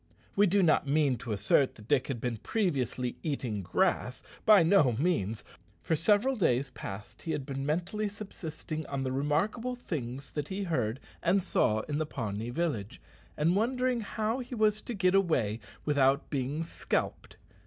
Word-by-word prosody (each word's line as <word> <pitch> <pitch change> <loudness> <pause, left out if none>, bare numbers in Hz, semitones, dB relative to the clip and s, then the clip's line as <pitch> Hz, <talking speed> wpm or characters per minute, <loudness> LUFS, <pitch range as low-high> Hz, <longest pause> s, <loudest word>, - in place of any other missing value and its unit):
We 205 +1 +5
do 195 +2 +3
not 155 -3 +3
mean 140 -3 +2
to 115 - -6
assert 120 +6 +2
that 105 -2 -14
Dick 135 -2 +2
had 135 -4 -3
been 120 -1 -2
previously 130 - -1
eating 125 -9 -2
grass. 90 - 0 0.2
By 210 -5 +8
no 160 -7 +5
means. 115 - 0 0.4
For 160 - +1
several 210 - +3
days 135 - +1
past 105 -3 -8
he 160 - -3
had 135 - -3
been 135 0 -4
mentally 180 +7 -1
subsisting 160 -6 -6
on 135 -1 -2
the 130 - -1
remarkable 165 - 0
things 135 - -5
that 150 -1 -3
he 195 +1 -3
heard 125 - -1 0.2
and 185 +2 +2
saw 110 - +2
in 145 +5 -3
the 155 - -1
Pawnee 110 -4 -4
village, 130 - -2 0.4
and 165 +4 +3
wondering 250 +3 +1
how 220 +3 -2
he 250 0 -6
was 215 -1 +2
to 240 - -5
get 185 -2 +3
away 130 - +2 0.3
without 140 -1 +2
being 140 +3 -1
scalped. 165 - -3
150 Hz, 165 wpm, -30 LUFS, 125-195 Hz, 0.4 s, By